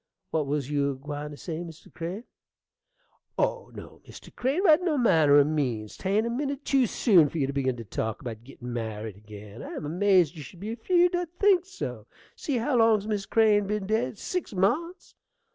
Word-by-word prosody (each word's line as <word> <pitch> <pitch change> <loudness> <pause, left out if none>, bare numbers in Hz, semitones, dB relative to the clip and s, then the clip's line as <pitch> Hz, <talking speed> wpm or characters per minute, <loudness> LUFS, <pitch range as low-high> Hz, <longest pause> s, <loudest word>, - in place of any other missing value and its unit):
What 155 -3 0
was 145 -1 -2
you 140 -1 +1
a 140 - -3
gwine 145 +2 -6
to 145 - -10
say, 160 0 -5
Mr. 170 -1 -10
Crane? 180 +6 -5 1.1
Oh, 485 -1 -1
no, - - -11
Mr. - - -13
Crane, 275 +9 0
by 315 -6 +7
no 350 -5 -1
manner 160 - +5
o' 145 - +7
means; 130 -8 -2
'tain't 205 +4 0
a - - -1
minute 280 +2 -3
tew 270 -3 +3
soon 180 - +4
for 165 - -6
you 140 - +1
to 140 - -4
begin 130 -2 -1
to 115 - -6
talk 110 +3 -3
about 115 -4 -7
gittin' 125 -2 -9
married 110 -3 -5
ag'in. 105 +1 -11
I - - -7
am - - -5
amazed 180 0 +3
you 155 - -8
should 170 +5 -12
be 215 +4 -4
afeerd 350 +8 +2
I'd 350 -1 -3
think 380 -3 +4
so. 125 - -6 0.3
See 280 -4 -2
how 250 +3 +1
long's 225 -3 +4
Miss 205 -2 -2
Crane 210 -3 +3
been 210 -1 -2
dead? 220 +2 -1
Six 360 - -4
months! 300 - -1
180 Hz, 200 wpm, -27 LUFS, -, 1.1 s, by